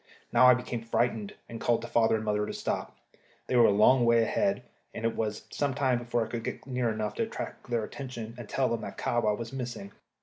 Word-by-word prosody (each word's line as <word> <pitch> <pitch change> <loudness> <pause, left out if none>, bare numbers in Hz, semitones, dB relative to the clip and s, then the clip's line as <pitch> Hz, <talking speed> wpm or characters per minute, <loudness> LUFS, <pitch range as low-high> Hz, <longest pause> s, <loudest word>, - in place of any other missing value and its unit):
Now 125 - +7
I 125 - +8
became 120 -1 -4
frightened, 115 -2 -1
and 115 -1 -8
called 120 - +1
to - - -5
father 115 -1 +3
and 110 0 -3
mother 105 0 0
to - - -4
stop. - - -3 0.5
They - - -1
were 120 -1 +7
a - - +4
long 120 +5 +5
way 115 -1 +5
ahead, 195 - 0 0.3
and 115 - -4
it 115 - 0
was 110 -1 -3
some 140 -2 -1
time 130 -3 +2
before 120 -1 -1
I - - -11
could 115 -1 -4
get - - -5
near 125 -3 0
enough 110 -1 -2
to - - 0
attract - - -7
their 120 -2 0
attention 120 -2 -6
and 120 -3 -9
tell 135 -1 +1
them 115 - -1
that - - -7
Kahwa 110 -3 +1
was 115 +1 -6
missing. 120 -6 -5
115 Hz, 235 wpm, -29 LUFS, 110-125 Hz, 0.5 s, I